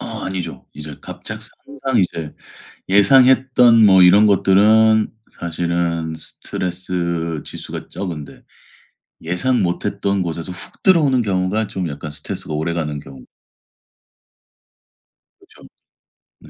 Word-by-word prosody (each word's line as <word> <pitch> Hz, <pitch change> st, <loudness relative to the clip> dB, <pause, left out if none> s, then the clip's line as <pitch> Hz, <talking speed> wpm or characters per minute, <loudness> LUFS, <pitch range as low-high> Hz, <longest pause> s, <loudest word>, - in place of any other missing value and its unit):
어. -, -, -7 dB, 0.2 s
아니죠. 90 Hz, -3 st, -5 dB
이제 75 Hz, -1 st, -8 dB
갑작스 -, -, -9 dB, 0.2 s
항상 135 Hz, -3 st, -1 dB
이제 80 Hz, -4 st, -3 dB, 0.5 s
예상했던 125 Hz, +2 st, +5 dB
뭐 95 Hz, -2 st, +6 dB
이런 100 Hz, +4 st, +7 dB
것들은 105 Hz, +3 st, +4 dB, 0.3 s
사실은 85 Hz, -1 st, -2 dB
스트레스 85 Hz, -1 st, -4 dB
지수가 -, -, -8 dB
적은데 85 Hz, -6 st, -7 dB, 0.8 s
예상 90 Hz, +10 st, 0 dB
못 90 Hz, -1 st, -2 dB
했던 100 Hz, -1 st, -1 dB
곳에서 85 Hz, +1 st, -5 dB
훅 90 Hz, -, -12 dB
들어오는 145 Hz, -9 st, +4 dB
경우가 100 Hz, +2 st, -1 dB
좀 90 Hz, -3 st, -4 dB
약간 75 Hz, +1 st, -7 dB
스트레스가 75 Hz, +1 st, -7 dB
오래 80 Hz, +2 st, -2 dB
가는 75 Hz, -3 st, -3 dB
경우. 65 Hz, -2 st, -12 dB, 2.1 s
그렇죠. -, -, -19 dB, 0.7 s
네. -, -, -17 dB
90 Hz, 255 characters per minute, -19 LUFS, 85-110 Hz, 2.1 s, 이런